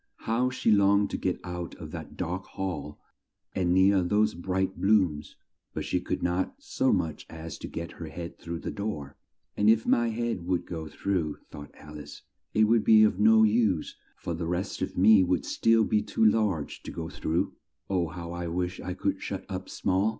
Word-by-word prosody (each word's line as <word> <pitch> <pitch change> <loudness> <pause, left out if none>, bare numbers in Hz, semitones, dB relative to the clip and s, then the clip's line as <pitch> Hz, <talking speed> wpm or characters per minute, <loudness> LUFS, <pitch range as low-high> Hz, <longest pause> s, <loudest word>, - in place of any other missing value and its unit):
How 120 +3 +1
she 130 -3 +1
longed 100 0 +4
to - - -2
get 90 - -1
out 90 -1 -5
of - - -9
that - - -8
dark 90 +3 -3
hall 90 -6 -5 0.5
and 90 -2 +1
near 95 +1 +5
those 105 +4 +2
bright 95 +2 -2
blooms; 95 -8 +2 0.4
but - - -3
she - - 0
could - - -3
not 90 +1 0
so - - 0
much 80 -2 -1
as 80 0 -8
get 85 +1 -6
her 85 - -8
head 85 +3 -8
through 85 0 -6
the - - -4
door; 100 -10 -5 0.4
"and 105 +1 +3
if 110 0 +4
my 120 0 +3
head 115 -6 -3
would 90 -2 0
go 80 -3 -6
through," 85 -3 -2
thought 75 0 -9
Al 75 0 -11
ice, 75 - -11 0.3
"it 110 - +5
would 110 0 +4
be 110 0 +7
of 105 -3 +2
no 110 +1 +6
use, 105 -6 +2 0.2
for 85 - -4
the 85 0 -3
rest 90 +3 -3
of - - -3
me 100 +1 +7
would 90 -4 0
still 115 0 +3
be 105 -1 +2
too 110 - 0
large 105 -8 +1
to - - -8
go 80 -1 -5
through. 85 -1 -1 0.3
Oh, 90 -3 0
how 85 0 -7
I 85 0 -4
wish 90 +2 -2
I 90 - -5
could - - -1
shut - - -5
up - - -5
small! 95 +3 +1
95 Hz, 195 wpm, -28 LUFS, 85-105 Hz, 0.5 s, be